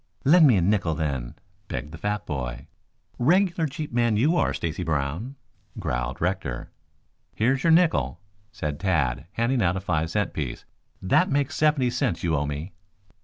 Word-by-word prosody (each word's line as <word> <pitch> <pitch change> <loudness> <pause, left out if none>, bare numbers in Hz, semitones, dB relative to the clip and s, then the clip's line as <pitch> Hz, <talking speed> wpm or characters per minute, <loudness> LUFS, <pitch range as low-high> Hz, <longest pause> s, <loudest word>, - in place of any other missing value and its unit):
"Lend 160 +2 +7
me 125 - +5
a 95 - +3
nickel, 95 -4 +1
then," 70 -7 -3 0.3
begged 70 +5 -5
the 80 - -8
fat 105 +2 -2
boy. 65 -2 -4 0.5
"Regular 170 +4 +3
cheap 150 -1 -6
man, 120 -3 +2
you 150 +10 +3
are, - - +2
Stacy 85 +1 -3
Brown." 80 - -2 0.4
growled 60 0 -3
Rector. 85 -9 -2 0.6
"Here's 130 +5 +1
your 165 - +3
nickel," 165 - +3 0.3
said 75 -8 -4
Tad, 75 -8 0
handing 120 +2 +1
out 90 -1 +2
a - - -1
five 85 -4 -1
cent 105 +4 -1
piece. 70 -6 -4 0.4
"That 95 - +3
makes 145 +2 0
seventy 150 -5 +2
cents 125 -5 -1
you 85 -2 +1
owe 70 0 0
me." 75 +5 -5
95 Hz, 165 wpm, -25 LUFS, -, 0.6 s, Lend